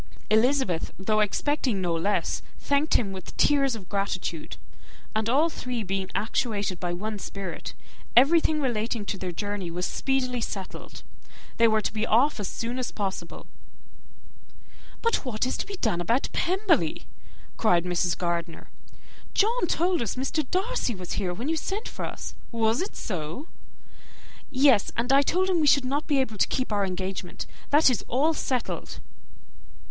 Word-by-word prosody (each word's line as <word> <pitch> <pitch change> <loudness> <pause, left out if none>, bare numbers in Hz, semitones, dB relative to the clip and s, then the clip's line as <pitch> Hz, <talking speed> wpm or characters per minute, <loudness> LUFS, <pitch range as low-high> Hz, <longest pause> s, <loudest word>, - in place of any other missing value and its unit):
Elizabeth, 220 - +2
though 215 +3 +1
expecting 240 +2 +1
no 175 -2 0
less, 165 +5 0 0.2
thanked 285 +2 +1
him 200 -5 +2
with 190 -2 -9
tears 275 -4 +4
of 195 -5 -9
gratitude; 190 -5 -3 0.6
and 220 +1 +1
all 290 +7 +4
three 250 -7 -4
being 190 -1 -2
actuated 205 -4 -1
by 175 -1 -2
one 210 +4 -3
spirit, 195 -2 -6 0.4
everything 310 +4 +5
relating 230 -4 -1
to 200 - -2
their 185 -2 -4
journey 205 0 -3
was 180 +2 -2
speedily 255 -2 0
settled. 195 -4 -6 0.5
They 230 - +6
were 220 -1 +3
to - - -1
be 215 0 -1
off 245 +4 +3
as 205 - -2
soon 235 +6 -3
as 255 - -2
possible. 195 -2 -4 1.6
"But 460 0 +2
what 245 -4 -1
is 255 - -1
to - - -3
be 400 - -5
done 220 - 0
about 235 +10 +1
Pemberley?" 385 +4 +1 0.5
cried 180 -6 +3
Mrs. 175 0 +1
Gardiner. 170 -1 -3 0.6
"John 450 -1 +3
told 350 +2 +1
us 225 - -2
Mr. 270 +2 -1
Darcy 385 - 0
was 180 -2 -7
here 190 -4 -1
when 230 +10 -4
you 325 - +1
sent 400 +8 -3
for - - -5
us; - - -6 0.2
was 230 +2 +2
it 385 - -4
so?" 180 - -4 1.0
"Yes; 265 -6 +4
and 245 +3 +2
I 275 - +7
told 365 +6 +1
him 365 -3 +2
we 300 - +3
should 280 -1 +5
not 280 +4 -1
be 285 -3 +3
able 225 -6 -1
to - - +4
keep 255 -3 -2
our 200 -1 +1
engagement. 185 0 -4 0.2
That 295 -2 +6
is 245 - -1
all 295 +6 +2
settled." 255 -5 -3
230 Hz, 160 wpm, -27 LUFS, 195-280 Hz, 1.6 s, I